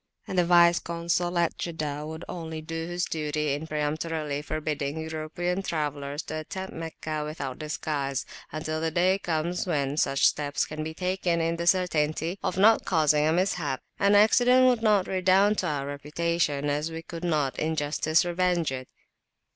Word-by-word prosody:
And - - -4
the 180 -1 +3
Vice 170 0 +6
Consul 170 +1 -1
at 170 -1 +1
Jeddah 150 -3 -3
would 160 +1 -7
only 160 -2 -5
do 165 +1 -5
his 175 0 -1
duty 150 -2 -1
in 150 +3 -4
peremptorily 150 -1 -2
forbidding 150 -1 -3
European 160 +4 -3
travellers 145 -4 -3
to 155 - -5
attempt 190 +4 -6
Meccah 155 -2 -4
without 140 -4 -5
disguise, 145 -3 -2 0.3
until 155 +1 -3
the 165 - +1
day 185 +3 +2
comes 170 +1 -2
when 145 -4 0
such 140 -2 +2
steps 145 -1 +1
can 155 0 -5
be 160 +1 -5
taken 180 -1 0
in 165 0 0
the 170 0 -3
certainty 170 -1 +1
of 180 - -2
not 220 +3 +5
causing 155 -3 +3
a - - +3
mishap; 170 -6 0 0.2
[p.241] 200 - +3
an 205 - +5
accident 245 +5 +6
would 250 -3 +4
not 210 -4 +3
redound 190 +3 +3
to 180 - 0
our 145 -3 -2
reputation, 145 +1 -1
as 150 +3 -1
we 165 0 -6
could 165 +1 -8
not 150 -6 0
in 160 +1 0
justice 155 +3 +1
revenge 175 -3 +1
it. 130 -1 -5
160 Hz, 170 wpm, -27 LUFS, 150-175 Hz, 0.3 s, Vice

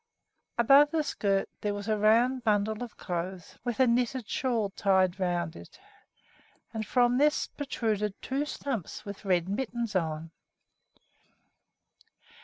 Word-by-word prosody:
Above 275 +5 +6
the 315 0 0
skirt 195 -8 0
there 205 -1 -1
was 205 +1 -6
a 215 - +2
round 235 +5 +3
bundle 215 0 +1
of 240 - -9
clothes 180 0 -5
with 240 -1 -3
a 260 - +6
knitted 245 0 0
shawl 230 -6 0
tied 190 -1 +2
around 175 -3 -1
it, 85 - -13 0.9
and 220 -1 -4
from 245 +1 +3
this 295 +1 +3
protruded 215 -7 -2
two 270 +2 -2
stumps 270 - -4
with 200 0 -8
red 180 -2 +2
mittens 235 +1 -3
on. 160 -2 -1
215 Hz, 130 wpm, -29 LUFS, 190-245 Hz, 0.9 s, Above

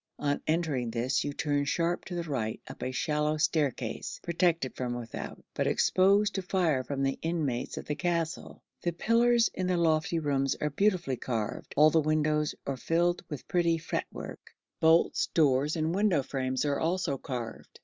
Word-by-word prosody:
On 145 -1 -1
entering 155 -7 0
this 120 +4 0
you 145 - -2
turn 145 0 0
sharp 170 +4 0
to 180 - -6
the 170 - -2
right 125 -9 -3
up - - -10
a 130 - -2
shallow 150 +3 0
staircase, 155 -4 -1
protected 170 -5 +1
from 125 -1 -3
without, 120 -2 -7
but - - 0
exposed 200 +3 +3
to 195 - -1
fire 175 -8 +1
from 135 +1 -3
the 135 0 0
inmates 155 -7 -2
of - - -5
the 150 - -2
castle. 165 +2 -2 0.2
The 175 - -1
pillars 230 +5 +3
in 185 0 -2
the 180 -1 +1
lofty 160 -1 +2
rooms 140 -3 0
are 150 - -2
beautifully 180 -6 +1
carved. 115 -4 -4
All 155 +2 +7
the 160 - +4
windows 150 0 +1
are 135 -1 -2
filled 175 +5 +1
with 150 -5 -7
pretty 170 -2 +2
fretwork; 160 - -6 0.2
bolts, 160 +1 +4
doors, 145 -1 +3
and 160 0 0
window 190 -7 +2
frames 130 0 -2
are 140 -1 0
also 165 -5 0
carved. 120 -4 -6
155 Hz, 170 wpm, -29 LUFS, 135-170 Hz, 0.2 s, All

